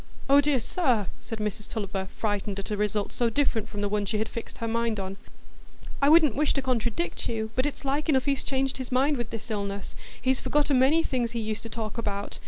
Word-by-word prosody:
"Oh 280 +1 +7
dear, 285 -2 +2
sir!" 245 - +1
said 225 - -6
Mrs 210 -1 -3
Tulliver, 195 -3 -3
frightened 205 -2 -1
at 195 +1 -5
a - - +1
result 210 0 0
so 240 -1 +1
different 230 -3 0
from 205 - -5
the 205 - +1
one 205 0 0
she 215 - 0
had 220 - 0
fixed 230 - -7
her 230 - -3
mind 230 -1 0
on; 190 0 -4 0.9
"I 280 - +5
wouldn't 310 -6 +6
wish 300 +2 +2
to 275 - +1
contradict 230 -9 -1
you, 220 -1 -2
but 255 +3 +2
it's 290 - -6
like 285 +4 0
enough 265 -3 +3
he's 280 -2 +1
changed 270 0 0
his 260 - -5
mind 275 +4 +3
with 240 -3 -3
this 225 0 -6
illness,—he's 205 +5 -3
forgot 295 0 +1
a - - +4
many 275 +6 +5
things 240 -5 -1
he 235 - -1
used 215 -1 -2
to 230 - -7
talk 220 0 -4
about. 205 -2 -3
230 Hz, 225 wpm, -27 LUFS, 210-270 Hz, 0.9 s, Oh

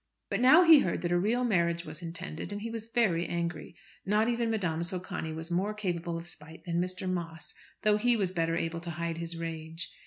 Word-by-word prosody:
But 200 - +1
now 305 +8 +8
he 325 -3 +9
heard 180 -8 -1
that 175 - 0
a 175 - +3
real 230 +7 +1
marriage 170 -6 +1
was 155 +2 -7
intended, 165 +1 -6
and 205 +1 -5
he 230 - -4
was 225 0 -4
very 190 -8 +2
angry. 170 0 -3 0.3
Not 210 +3 +2
even 235 -1 +1
Madame 180 -7 0
Socani 180 -1 -4
was 160 +2 -6
more 195 +5 0
capable 175 -4 -2
of 165 - -7
spite 160 -1 -11
than 170 0 0
Mr. 185 +1 -3
Moss, 170 -3 -4 0.3
though 210 -1 +5
he 240 +2 +3
was 190 -4 0
better 165 -2 0
able 165 0 -2
to 170 +1 -6
hide 170 -1 -2
his 170 0 -5
rage. 165 0 -5
175 Hz, 215 wpm, -30 LUFS, 165-210 Hz, 0.3 s, he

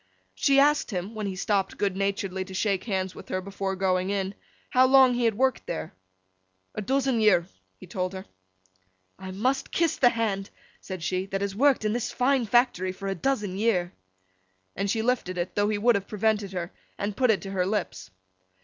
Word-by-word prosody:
She 275 - +3
asked 295 +2 +3
him, 190 +1 -4
when 215 -2 -3
he 190 - -4
stopped 195 0 -1
good 200 -2 0
naturedly 195 -1 -1
to 190 0 -9
shake 195 -1 0
hands 190 -4 -2
with - - -12
her 185 - -1
before 195 0 -4
going 185 0 0
in, 195 -1 -1 0.4
how 255 +1 +5
long 265 -1 +6
he 240 0 0
had 225 -2 +2
worked 260 +1 0
there? 80 - -4 0.8
'A - - -4
dozen 260 +1 +1
year,' 185 -5 +4 0.3
he - - -12
told 185 +1 -3
her. 190 0 -7 0.9
'I 190 0 -7
must 255 +8 0
kiss 335 -2 +1
the 245 - +6
hand,' 210 -4 -2 0.3
said 185 -3 -7
she, 185 +4 -1
'that 195 0 -3
has 200 -1 -2
worked 270 -1 +3
in 215 - +1
this 240 0 -2
fine 255 -2 +1
factory 225 -6 +2
for 195 +1 -7
a - - 0
dozen 205 -2 -1
year!' 185 -5 +1 0.8
And 200 +2 -2
she 220 +2 0
lifted 225 -7 0
it, 175 +1 -2
though 205 0 +1
he 215 - 0
would 235 +4 +4
have 200 -2 -2
prevented 210 -1 0
her, 175 -1 -4 0.3
and 205 0 -3
put 255 +1 +2
it 215 -2 +2
to 195 - -6
her 185 -2 0
lips. 190 - -3
200 Hz, 200 wpm, -26 LUFS, 190-235 Hz, 0.9 s, long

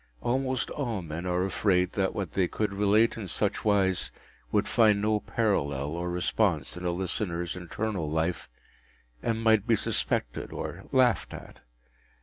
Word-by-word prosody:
Almost 130 +1 0
all 120 -10 -2
men 85 +3 -5
are 90 +1 +1
afraid 90 -2 +2
that 95 -2 0
what 95 -6 -3
they 95 +1 +1
could 105 +2 -2
relate 105 +4 +3
in 105 -4 -5
such - - -1
wise 95 - +2 0.4
would - - +2
find 110 -3 +4
no 105 +1 +2
parallel 70 - 0
or 85 +2 -3
response 90 -3 0
in 90 - -7
a - - +2
listener’s 85 -1 -2
internal 90 -1 -3
life, 80 +3 -1 0.7
and 115 0 -1
might 110 -1 +4
be 115 - +5
suspected - - -2
or - - -6
laughed 130 -3 +3
at. - - -11
95 Hz, 150 wpm, -28 LUFS, 85-110 Hz, 0.7 s, be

